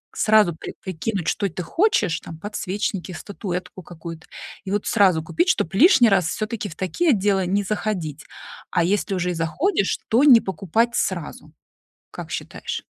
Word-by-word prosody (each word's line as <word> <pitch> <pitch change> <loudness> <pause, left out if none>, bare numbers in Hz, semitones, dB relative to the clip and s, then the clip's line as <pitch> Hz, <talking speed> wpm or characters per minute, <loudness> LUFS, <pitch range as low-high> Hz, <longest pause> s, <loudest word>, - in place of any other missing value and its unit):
сразу 215 -5 +4
при - - -8
прикинуть, 185 0 -3
что 200 -2 0
ты 180 +2 -5
хочешь, 205 - +1
там 165 - -9
подсвечники, 195 -1 -3
статуэтку 185 -1 -6
какую-то, 165 -1 -10 0.4
и 190 - -4
вот 205 0 -1
сразу 190 -7 +4
купить, 345 - 0
чтоб 175 - 0
лишний 260 - +6
раз 190 -4 +3
всё-таки 215 +3 -3
в 165 - -11
такие 190 - +1
отделы 195 -3 +2
не 200 +3 +1
заходить, 195 -7 -3 0.5
а - - +2
если 195 +1 0
уже 180 0 -1
и - - -2
заходишь, 195 - 0
то 240 +6 +4
не 245 -6 +8
покупать 215 +5 0
сразу. 165 -4 -3 0.6
Как - - -8
считаешь? - - -5
195 Hz, 155 wpm, -22 LUFS, 175-215 Hz, 0.6 s, не